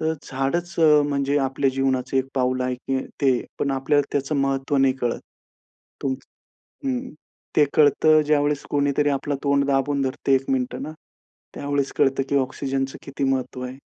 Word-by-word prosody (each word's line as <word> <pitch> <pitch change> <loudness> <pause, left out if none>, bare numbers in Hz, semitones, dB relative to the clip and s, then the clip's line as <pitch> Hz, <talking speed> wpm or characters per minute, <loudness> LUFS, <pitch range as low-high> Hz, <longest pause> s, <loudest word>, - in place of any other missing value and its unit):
तर 160 0 +1
झाडचं 155 +3 +2
अ, - - +2
म्हणजे 140 0 0
आपल्या 135 0 +1
जीवनाचं 135 0 -1
एक 130 0 +2
पाऊल 130 -1 +1
आहे 125 0 -1
की 130 +1 -3
ते 130 -4 +3 0.2
पण 140 - 0
आपल्याला 135 +2 +1
त्याचं 145 +1 -1
महत्त्व 135 0 0
नाही 135 -1 +4
कळत. 120 -1 -1 0.8
तुमच 130 -1 -2 0.6
हं. 260 -1 -2 0.5
ते 150 - +6
कळतं 155 +1 +5
ज्यावेळेस 145 -1 +1
कोणीतरी 145 0 +1
आपला 140 +1 -1
तोंड 140 -1 +2
दाबून 140 0 +1
धरतं 135 +1 -1
एक 135 0 +3
मिनिटं 130 -2 -1
ना, 155 - -5 0.6
त्यावेळेस 140 -1 -1
कळतं 135 0 +2
की - - +1
ऑक्सिजनच 135 0 -2
किती 140 0 -5
महत्व 130 -1 -1
आहे. 130 +1 -8
135 Hz, 160 wpm, -23 LUFS, 135-145 Hz, 0.8 s, ते